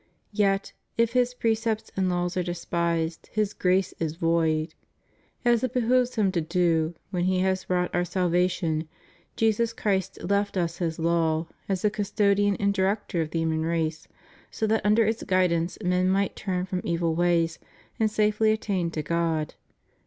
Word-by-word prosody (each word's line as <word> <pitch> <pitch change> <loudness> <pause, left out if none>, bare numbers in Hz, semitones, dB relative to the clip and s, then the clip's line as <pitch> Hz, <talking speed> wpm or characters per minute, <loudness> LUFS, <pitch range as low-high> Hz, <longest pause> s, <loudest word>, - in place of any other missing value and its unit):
Yet, 195 -1 +1 0.2
if 230 0 +2
His 250 0 +2
precepts 225 -2 -1
and 190 -1 +1
laws 175 0 -1
are 185 - +1
despised, 170 -1 -2
His 210 -1 0
grace 185 +1 +1
is 160 -1 -2
void. 165 -2 +1 0.7
As 240 -1 +3
it 255 -1 -1
behooved 250 0 +2
him 205 -4 +2
to 175 -3 0
do, 165 -1 +1 0.2
when 180 -2 0
He 185 0 +2
had 190 0 0
wrought 180 -1 0
our 175 - +2
salva 180 0 +1
tion, 160 -3 -2 0.5
Jesus 225 +1 +1
Christ 195 -5 -1
left 200 0 0
us 170 -1 -1
His 165 -3 -1
law, 165 -1 +1 0.2
as 190 -2 -1
the 210 - +3
custodian 205 -1 +1
and 200 0 +1
director 195 -2 0
of 155 - -2
the 165 +1 -1
human 160 -1 0
race, 160 -1 -2 0.4
so 220 - -2
that 220 +1 +1
under 215 +2 +4
its 220 +2 -1
guidance 180 -2 +1
men 180 +1 +2
might 195 +1 +1
turn 180 -2 -2
from 185 -1 -3
evil 170 -1 0
ways 170 -1 +1 0.4
and 220 -1 +3
safely 215 +1 +2
attain 195 -5 -1
to 155 -2 -4
God. 165 -1 -1
185 Hz, 165 wpm, -26 LUFS, 170-210 Hz, 0.7 s, under